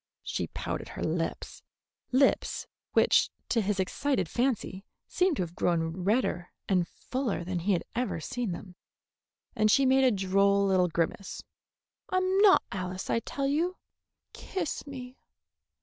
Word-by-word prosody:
She - - -2
pouted - - -5
her - - -6
lips, - - -3 0.5
lips 265 +2 +2 0.3
which - - +4 0.2
to 235 -1 +2
his 200 -1 -1
excited 265 +8 0
fancy 235 -6 -1 0.2
seemed 365 -3 +2
to - - +1
have 170 -1 -7
grown 165 +1 0
redder 205 -5 +1 0.2
and 180 -3 +2
fuller 250 -5 -3
than 180 0 -2
he 195 +4 +1
had 175 - 0
ever 240 -7 -1
seen 240 +4 -3
them, 180 +1 -7 0.8
and 215 0 +3
she 270 +5 +5
made 265 +1 +5
a 260 - +6
droll 200 -1 +3
little 185 -2 +3
grimace. 170 +3 -2 0.7
"I'm 370 +1 +2
not 405 -2 +7
Alice, 185 -1 -4
I - - +2
tell 275 +4 -3
you. 330 +7 0 0.6
Kiss 350 -6 -4
me." 255 -2 -8
210 Hz, 145 wpm, -29 LUFS, 185-270 Hz, 0.8 s, not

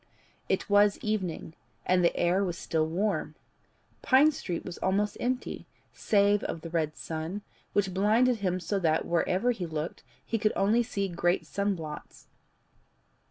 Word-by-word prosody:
It - - 0
was 205 0 +4
evening, 190 -7 -2 0.3
and 180 0 +3
the 170 - +3
air 180 +3 +2
was 175 -3 -2
still 155 -1 0
warm. 165 -3 -1 0.7
Pine 275 +4 +5
Street 180 - -5
was 180 - -7
almost 200 +2 0
empty, 250 +1 -3 0.3
save 205 0 +3
of 165 - -4
the 165 - -8
red 155 -2 -1
sun, 165 +6 -5 0.3
which 195 -2 +1
blinded 225 +6 +3
him 185 -3 -1
so 185 +3 -1
that 160 -3 +1
wherever 180 +7 +1
he 195 -7 -4
looked 155 +1 -4 0.2
he 225 - -1
could 215 0 +2
only 215 +5 +3
see 200 -4 -2
great 175 0 0
sunblots. 180 -7 -4
190 Hz, 150 wpm, -29 LUFS, 170-210 Hz, 0.7 s, Pine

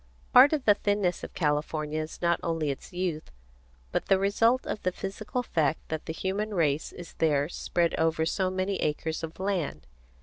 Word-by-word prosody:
Part 265 +3 +9
of 300 -4 -1
the 210 - +7
thinness 205 -3 0
of - - -8
California 150 0 -1
is 155 +3 -8
not 170 0 +3
only 165 -3 -1
its 135 - -8
youth, 175 -4 -3 0.6
but - - -1
the 195 - +5
result 225 +6 +2
of - - -4
the 185 - 0
physical 210 +7 -4
fact 160 - 0
that 160 -1 -4
the - - -2
human 200 +5 -2
race 150 -3 +1
is 175 -2 -10
there 145 -3 +2
spread 170 0 0
over 160 0 +2
so 185 +2 0
many 185 +1 -1
acres 160 +1 -2
of 165 +1 -7
land. 185 - -2
175 Hz, 180 wpm, -28 LUFS, 155-195 Hz, 0.6 s, Part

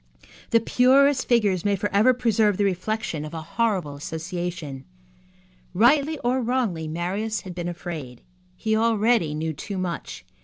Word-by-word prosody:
The 230 - +4
purest 260 +4 +3
figures 205 -7 +2
may 205 -1 +2
forever 205 +4 +3
preserve 220 -5 +2
the 205 - +1
reflection 195 -3 -2
of 155 +2 -7
a 160 - -5
horrible 190 -5 -1
association. 160 -2 -5 0.9
Rightly 280 - +4
or 250 +2 +1
wrongly, 230 -10 -1
Marius 190 +7 -2
had 185 - -8
been 175 -1 -4
afraid. 160 -8 -7 0.3
He 220 +3 0
already 220 -7 +2
knew 160 +1 -2
too 195 +6 -6
much. 175 -5 -5
200 Hz, 140 wpm, -24 LUFS, 170-230 Hz, 0.9 s, The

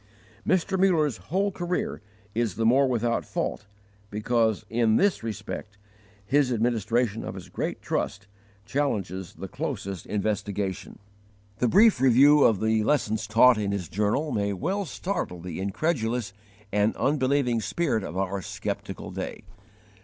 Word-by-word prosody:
Mr. 185 +1 +1
Muller's 160 - +3
whole 195 +3 +1
career 175 - -3 0.3
is 115 -5 0
the 115 - 0
more 135 +4 +5
without 120 -2 0
fault 105 - -3 0.4
because 110 +1 0
in 115 -1 +2
this 200 - +2
respect 105 -2 -6 0.5
his 135 +2 +2
administration 115 -1 0
of - - -6
his - - -9
great - - -4
trust 100 - -2 0.4
challenges 95 - -2
the - - -7
closest 95 -3 -5
investigation. 100 -2 -2 0.6
The 125 - +3
brief 200 - +5
review 140 +3 +6
of 110 -5 +3
the 110 0 +2
lessons 110 -5 0
taught 115 +2 +6
in 100 -1 -1
his 100 -4 -3
journal 105 - 0
may 100 -1 0
well 190 - -2
startle 160 - -3
the 85 0 -6
incredulous 115 - -1 0.4
and 105 +2 +2
unbelieving 135 -4 +1
spirit 135 -6 0
of 90 - -6
our 95 0 -1
skeptical - - -5
day. - - -5
115 Hz, 135 wpm, -26 LUFS, 105-140 Hz, 0.6 s, review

